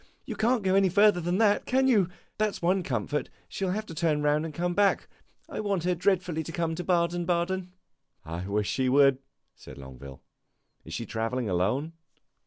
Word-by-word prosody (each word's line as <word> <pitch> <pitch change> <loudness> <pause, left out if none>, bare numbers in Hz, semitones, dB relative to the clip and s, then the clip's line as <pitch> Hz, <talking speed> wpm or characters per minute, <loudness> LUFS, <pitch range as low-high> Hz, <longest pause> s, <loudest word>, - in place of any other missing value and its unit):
You - - -5
can't 230 0 +1
go 190 -1 +2
any 195 -1 +4
further 200 0 +4
than 175 +2 0
that, 210 -2 +2
can 265 +1 +2
you? 205 -9 +3 0.3
That 215 -1 +1
's - - -9
one 185 +2 +2
comfort; 135 - -2 0.2
she 195 - -4
will 185 - 0
have 215 +2 -3
to 165 - -9
turn 155 -2 0
round 150 +1 +2
and 165 - -5
come 175 +3 -2
back. 200 +1 +2 0.4
I - - -6
want 200 -5 -1
her 180 +1 +1
dreadfully 180 -2 0
to 160 - -7
come 165 -1 -1
to 175 +2 -4
Baden 175 -1 +1
Baden." 180 +1 -1 0.5
"I 85 +3 -5
wish 105 0 0
she 130 -1 0
would," 135 0 +5 0.4
said - - -13
Longueville. 65 0 -11 0.6
"Is 80 - -7
she 115 - -4
travelling 115 +1 -2
alone?" 125 - 0
170 Hz, 195 wpm, -28 LUFS, 130-190 Hz, 0.6 s, would